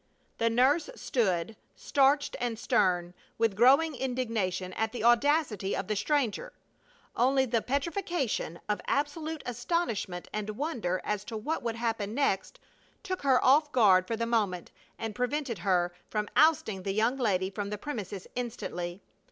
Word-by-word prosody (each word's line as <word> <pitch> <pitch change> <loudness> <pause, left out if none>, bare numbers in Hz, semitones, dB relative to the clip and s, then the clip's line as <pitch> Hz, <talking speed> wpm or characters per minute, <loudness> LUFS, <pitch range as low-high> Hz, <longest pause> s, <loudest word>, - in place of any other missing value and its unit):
The 230 - +3
nurse 265 - +3
stood, 215 - 0 0.2
starched 285 +1 +2
and 240 -2 -2
stern, 180 -5 +1 0.2
with 225 -3 +1
growing 275 +8 +5
indignation 230 -8 -2
at 220 +2 -2
the 245 - -4
audacity 240 - +2
of 195 - -3
the 215 - -1
stranger. 285 - -1 0.6
Only 265 +2 +3
the 230 -2 0
petrification 280 - -2
of 205 -3 -1
absolute 305 +2 -2
astonishment, 230 - -2
and 215 0 -4
wonder 230 - -2
as 210 -1 -2
to 225 - -5
what 300 +9 -2
would 230 -1 -2
happen 225 -2 -2
next, 255 -9 0 0.4
took 370 -1 -3
her 265 -3 +3
off 290 +4 +6
her - - -31
guard 190 -6 +5
for 230 - -1
the 230 +1 -1
moment 210 -7 -1 0.3
and 225 -1 -4
prevented 250 - -2
her 175 -1 +1 0.2
from 210 -1 -2
ousting 285 -11 +3
the 195 +1 -2
young 225 +5 +1
lady 190 -6 0
from 200 0 -4
the 210 - -3
premises 205 -7 -6
instantly. 195 -7 -5
230 Hz, 150 wpm, -29 LUFS, 200-275 Hz, 0.6 s, off